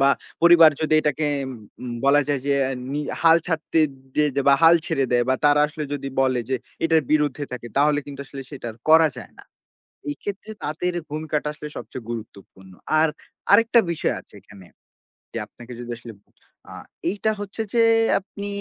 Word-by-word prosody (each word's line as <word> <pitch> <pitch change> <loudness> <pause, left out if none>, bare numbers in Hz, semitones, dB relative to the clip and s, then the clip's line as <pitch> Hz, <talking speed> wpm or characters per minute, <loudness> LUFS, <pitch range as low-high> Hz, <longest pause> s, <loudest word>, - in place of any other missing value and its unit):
বা 135 0 +5 0.3
পরিবার 170 -2 +8
যদি 155 0 +1
এটাকে 150 0 -1 0.2
এম 130 - -6 0.3
উম 125 - -5
বলা 140 +1 +5
যায় 145 -2 0
যে, 140 - +2 0.4
নি 145 - -1 0.2
হাল 165 0 +7
ছাড়তে 165 -1 0 0.3
দিয়ে 150 0 +3
দে 140 - +1
বা 140 - +7
হাল 165 +1 +8
ছেড়ে 135 - 0
দেয় 120 0 +3
বা 130 - +4
তারা 145 0 +5
আসলে 150 +1 -6
যদি 140 -1 -3
বলে 130 -2 +2
যে, 130 - +2 0.3
এটার 165 -1 +3
বিরুদ্ধে 145 -2 +1
থাকে। 120 -1 -6
তাহলে 145 +1 +3
কিন্তু 140 -1 -8
আসলে 135 -1 -8
সেটা 140 -5 -8
আর - - -19
করা 160 0 +7
যায় - - -11
না। - - -13 0.7
এক্ষেত্রে 205 +6 -7
তাদের 165 +4 -2 0.2
ভূমিকাটা 150 0 -2
আসলে 150 - -8
সবচেয়ে 125 -4 -8
গুরুত্বপূর্ণ। 100 -4 -9 0.3
আর 160 - +4 0.4
আরেকটা 230 +3 +6
বিষয় 165 - -1
আছে - - -24
এখানে। 100 -1 -16 0.7
যে - - -4
আপনাকে 120 +1 -14
যদি 120 0 -7
আসলে 115 -1 -10 0.6
আ - - -9 0.4
এইটা 210 +3 0
হচ্ছে 205 +2 -5
যে, 235 - +4 0.4
আপনি 200 +1 -8
150 Hz, 175 wpm, -23 LUFS, 130-165 Hz, 0.7 s, পরিবার